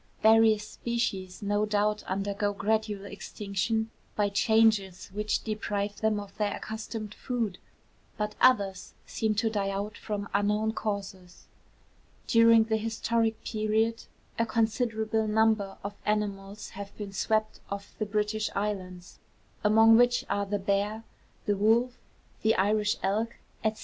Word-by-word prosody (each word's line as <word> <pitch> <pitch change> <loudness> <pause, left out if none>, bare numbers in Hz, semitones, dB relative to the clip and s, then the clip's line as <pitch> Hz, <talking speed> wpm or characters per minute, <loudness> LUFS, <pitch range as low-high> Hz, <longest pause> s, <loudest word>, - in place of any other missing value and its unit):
Various 220 -1 +5
species 210 -6 -3
no 205 +1 +1
doubt 210 0 +1
undergo 200 +1 -1
gradual 210 -1 -1
extinction 210 +2 -3 0.2
by 205 -1 +2
changes 200 -3 +2
which 210 +1 -1
deprive 205 -2 -2
them 220 -1 +1
of 205 -1 -9
their 210 -1 0
accustomed 220 -1 -6
food; 230 -8 -3 0.6
but 210 0 -2
others 200 -7 +3
seem 220 -1 -1
to 215 +2 +1
die 200 -2 0
out 200 +1 -3
from 205 -2 -4
unknown 210 +2 +1
causes. 195 -5 -5 0.8
During 230 -1 +6
the 220 0 0
historic 225 0 -1
period 220 +1 0 0.3
a 230 - +3
considerable 220 -1 0
number 215 -2 +2
of 200 +1 -4
animals 205 -1 -2
have 200 0 -9
been 205 -2 -6
swept 215 +2 0
off 200 0 -6
the 215 - -1
British 210 +1 0
Islands, 185 -3 -4 0.4
among 225 +1 +7
which 245 0 +3
are 200 0 -1
the 205 +1 0
bear, 205 +3 -1 0.4
the 205 - +2
wolf, 230 +5 +3 0.5
the 220 +1 +3
Irish 210 +2 +2
elk, 220 +4 0 0.3
&c. 220 - +3
210 Hz, 130 wpm, -28 LUFS, 200-220 Hz, 0.8 s, among